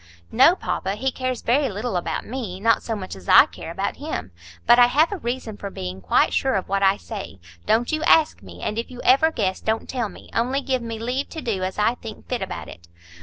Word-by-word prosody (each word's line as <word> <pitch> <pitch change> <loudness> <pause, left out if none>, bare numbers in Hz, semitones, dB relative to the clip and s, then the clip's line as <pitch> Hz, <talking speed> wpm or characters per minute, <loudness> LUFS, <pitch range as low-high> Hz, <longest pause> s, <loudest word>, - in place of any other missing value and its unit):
"No, 270 +9 +6
papa; 195 - -3
he 265 +5 -1
cares 255 -1 -3
very 270 +3 +2
little 215 +2 -3
about 175 - -2
me,—not 225 -3 0
so 225 - -3
much 185 - -6
as 95 -2 -11
I - - +9
care - - -10
about - - -3
him. 90 - -5 0.3
But 240 +1 +6
I 245 - +8
have 300 +8 +3
a 405 - -2
reason 240 -4 -4
for 200 - -6
being 95 - -6
quite 85 - +2
sure 265 -3 +1
of 190 - -1
what 195 0 0
I 195 0 +4
say. 195 - -8 0.3
Don't 230 +2 +2
you 310 0 -1
ask 320 -2 +4
me. - - -11
And 210 +2 -2
if 230 - -4
you 250 -1 -10
ever 275 +5 +5
guess, 195 -10 -1
don't 220 +1 -1
tell 240 -5 -2
me. - - -14
Only 255 +4 0
give 260 -2 -1
me 230 -1 -5
leave 250 +5 -2
to 320 - -6
do 210 -5 -2
as 185 0 -3
I 210 +3 +3
think 225 -3 -10
fit 250 -2 -2
about 190 - -5
it." 85 0 -12
230 Hz, 235 wpm, -23 LUFS, 195-255 Hz, 0.3 s, I